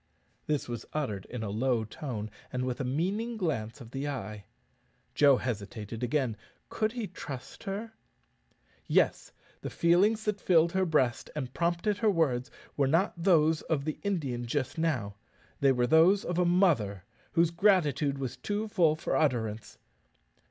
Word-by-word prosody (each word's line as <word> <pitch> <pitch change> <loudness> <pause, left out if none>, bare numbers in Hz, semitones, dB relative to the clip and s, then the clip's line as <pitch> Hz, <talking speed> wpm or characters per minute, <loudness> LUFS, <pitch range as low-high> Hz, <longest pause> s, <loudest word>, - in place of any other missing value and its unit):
This 150 -2 -1
was 120 -2 -5
uttered 115 -11 -2
in 120 -2 -5
a 100 - -3
low 120 +1 +1
tone, 110 -2 -6 0.2
and 125 0 -2
with 130 +2 -3
a - - -1
meaning 195 - -1
glance 115 - -2
of 115 -1 -11
the 135 +2 -3
eye. 105 -7 -6 0.7
Joe 140 -3 +5
hesitated 110 -1 -5
again 125 -3 0 0.3
could 215 0 -1
he 240 -3 -3
trust 145 -9 -8
her? 210 +3 -4 0.9
Yes; - - +2 0.3
the - - -4
feelings 200 +6 +3
that 210 -2 -1
filled 170 -2 +4
her 190 0 +1
breast 130 -6 +1
and 130 -4 -4
prompted 175 +4 0
her 220 - +3
words 145 -9 +1 0.3
were 140 -2 +2
not 165 +8 +2
those 165 -3 +3
of 145 -3 -2
the 155 - -3
Indian 140 - -2
just 130 +1 -2
now 120 -12 -1 0.4
they 140 -1 +4
were 125 -2 +2
those 165 +9 +5
of 175 0 -1
a 180 - +3
mother, 155 - +2 0.3
whose 170 -1 +3
gratitude 170 -7 +2
was 130 -3 -4
too 210 +1 -2
full 170 -7 +3
for 155 - -2
utterance. 115 -8 -1
150 Hz, 160 wpm, -29 LUFS, 120-175 Hz, 0.9 s, Joe